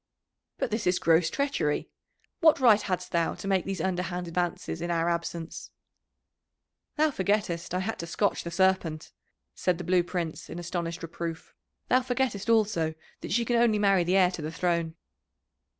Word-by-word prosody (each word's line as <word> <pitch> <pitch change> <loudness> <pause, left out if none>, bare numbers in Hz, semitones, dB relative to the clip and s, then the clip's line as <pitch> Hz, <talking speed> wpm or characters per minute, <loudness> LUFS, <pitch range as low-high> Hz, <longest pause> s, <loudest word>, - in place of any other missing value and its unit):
"But - - -2
this 215 -3 -1
is 180 0 +3
gross 165 0 +3
treachery 280 - -1 0.5
what 315 -3 +5
right 225 -5 +6
hadst 180 -2 -3
thou 170 -2 +1
to - - -7
make 190 -2 +1
these 195 -2 -3
underhand 180 0 -2
advances 170 -1 -2
in 170 - -3
our 170 -1 +1
absence?" 170 -1 -4 1.3
"Thou 310 0 +3
forgettest 190 -5 -1
I 185 - 0
had 220 +4 -3
to 170 - -5
scotch 200 +4 0
the 170 - -4
Serpent," 170 -3 +1 0.4
said 180 -2 0
the 180 - -6
Blue 180 +1 +3
Prince 175 -2 -4
in - - -6
astonished 170 0 -4
reproof. 165 +1 -6 0.3
"Thou 255 - +4
forgettest 245 -5 -1
also 205 -8 +2 0.2
that - - -7
she 235 +4 +2
can 240 +1 +1
only 230 -2 +4
marry 195 -3 +3
the 180 +3 +2
heir 180 -2 +5
to 175 - -6
the 155 +1 -4
throne." 170 -1 -1
180 Hz, 170 wpm, -28 LUFS, 170-205 Hz, 1.3 s, right